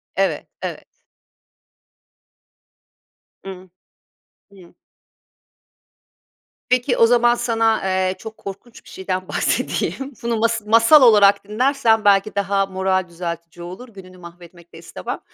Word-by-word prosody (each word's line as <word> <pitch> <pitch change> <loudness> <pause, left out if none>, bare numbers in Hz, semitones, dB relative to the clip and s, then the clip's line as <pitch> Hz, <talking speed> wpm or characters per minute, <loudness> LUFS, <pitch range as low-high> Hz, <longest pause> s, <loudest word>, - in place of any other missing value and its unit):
Evet, - - -1
evet. - - -6 2.6
I 195 - -8
hı. 185 -1 -11 0.8
Hıı. 185 -3 -18 2.0
Peki, 250 +1 +1
o 230 - +6
zaman 240 0 +3
sana, 225 -2 0
eee, 190 0 -1
çok 220 -1 -10
korkunç 200 +4 -11
bir - - -17
şeyden 185 0 -5
bahsedeyim. 275 +1 -2
Bunu 235 -1 -1
mas 230 +1 0
masal 230 +7 +5
olarak 210 -5 +5
dinlersen 230 -1 +1
belki 200 +1 +3
daha 200 0 0
moral 190 -1 -1
düzeltici 170 0 -7
olur, 185 +9 -10
gününü 185 -4 -14
mahvetmek 170 0 -15
de - - -12
istemem 165 - -7
200 Hz, 115 wpm, -20 LUFS, 185-230 Hz, 2.6 s, o